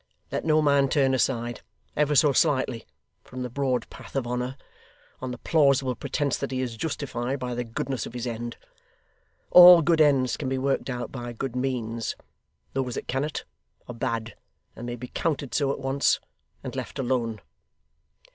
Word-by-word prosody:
Let - - -2
no 155 -1 +4
man 140 -2 +4
turn 135 -2 +3
aside, 120 -2 0 0.3
ever 150 0 +2
so 145 +1 +6
slightly, 130 -3 +1 0.4
from 130 0 -7
the 125 - -5
broad 130 -3 0
path - - -12
of 135 -3 0
honour, 125 +2 -3 0.6
on 130 - -3
the 125 - -5
plausible 140 -3 +3
pretence 140 +2 -1
that 140 - -3
he 130 - -2
is 125 -3 -2
justified 135 -2 -3
by 125 -2 -4
the 120 0 -2
goodness 120 +1 -3
of - - -11
his 120 0 -3
end. 120 0 -4 0.9
All 180 -1 +10
good 165 0 +3
ends 135 -4 +3
can 135 - -3
be 135 - -1
worked 135 +1 0
out 125 -1 -4
by 120 -2 -6
good 125 +1 -4
means. 120 -3 -2 0.6
Those 130 -2 -2
that - - -5
cannot, 140 +4 -2 0.4
are 120 - -6
bad; 115 -1 -3 0.4
and 120 - -7
may 120 - -3
be 125 +1 -8
counted 145 -5 -2
so 140 -2 +2
at - - -3
once, 135 +1 +1 0.4
and - - -6
left - - -5
alone. 120 -4 -1
130 Hz, 175 wpm, -26 LUFS, 120-140 Hz, 0.9 s, All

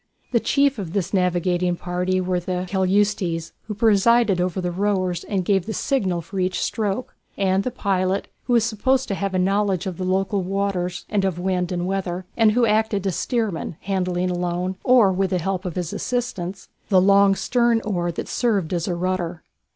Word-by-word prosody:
The 240 - +3
chiefs 280 0 +2
of 180 -4 -5
this 195 -2 -2
navigating 180 -1 +1
party 180 +1 -1
were 180 -1 0
the 180 +1 -3
keleustes, 190 -3 0 0.2
who 210 - -4
presided 220 -1 +4
over 180 0 -1
the 180 -1 -2
rowers 185 -2 0
and 190 -3 -2
gave 195 -1 +1
the 220 - -3
signal 190 -11 0
for 190 +3 -6
each 185 0 0
stroke, 215 +2 -2 0.2
and 195 0 +2
the - - -1
pilot, 190 -4 -1 0.2
who 245 - 0
was 235 -2 +4
supposed 255 +4 +1
to - - 0
have 195 0 -2
a - - +2
knowledge 195 0 +1
of 185 -3 -4
the 185 - -3
local 190 +2 0
waters 185 -1 -2
and 205 -2 0
of 190 -3 0
wind 180 0 -1
and 175 -1 -1
weather, 185 -1 -2
and 220 -2 +4
who 240 +1 +3
acted 215 -2 +1
as 190 -4 0
steersman, 215 - -2
handling 185 -2 -1
alone, 180 +1 -2
or 245 -6 +5
with 190 +1 0
the 185 - +1
help 185 +2 -2
of 180 - -4
his 175 -2 -3
assistants, 200 -7 -3 0.2
the 190 -3 +5
long 200 +1 +5
stern 235 +1 +2
oar 175 -4 -1
that 170 - -5
served 200 -9 0
as 175 +1 -1
a 180 - -1
rudder. 175 -2 -2
190 Hz, 190 wpm, -22 LUFS, 180-205 Hz, 0.2 s, or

